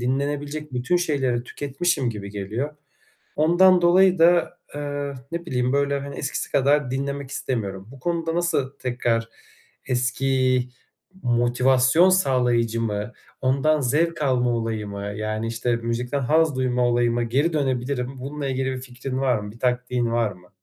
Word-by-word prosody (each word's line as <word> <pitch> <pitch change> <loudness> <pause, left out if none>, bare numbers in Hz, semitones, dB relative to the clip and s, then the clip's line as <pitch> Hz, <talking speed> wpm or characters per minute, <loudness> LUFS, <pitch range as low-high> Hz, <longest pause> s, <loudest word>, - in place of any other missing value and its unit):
dinlenebilecek 145 +3 -2
bütün 125 +8 +1
şeyleri 140 -8 0
tüketmişim 140 +1 -1
gibi 100 -3 -7
geliyor. 110 +9 -4 0.6
Ondan 175 +4 +5
dolayı 180 +1 +5
da, 175 +1 +4 0.2
eee, 145 -1 -3 0.2
ne 170 0 -4
bileyim 125 -4 0
böyle, 140 0 +1
hani, 140 0 -7
eskisi 135 - -3
kadar 140 -1 +2
dinlemek 140 0 -3
istemiyorum. 100 -8 -3
Bu 135 - -13
konuda 165 +2 -1
nasıl 140 -6 -1
tekrar 120 -2 -1 0.6
eski 130 0 +1 0.5
motivasyon 125 +7 +4
sağlayıcı 125 -9 +2
mı, 105 0 -3 0.3
ondan 140 +4 +2
zevk 155 +6 +1
alma 125 -3 +2
olayı 115 -2 -2
mı, 100 0 -6
yani, 110 +1 -3
işte, 115 +1 -1
müzikten 115 +4 -2
haz 155 +3 +2
duyma 125 -1 +1
olayıma 120 0 +1
geri 140 +8 +1
dönebilirim? 130 -2 -1
Bununla 140 +2 -4
ilgili 130 0 -1
bir 130 - -7
fikrin 130 +1 -6
var 130 -3 +2
mı, 105 0 -7
bir 115 - -16
taktiğin 125 -1 0
var 115 -2 +1
mı? 90 -2 -16
130 Hz, 145 wpm, -23 LUFS, 120-145 Hz, 0.6 s, Ondan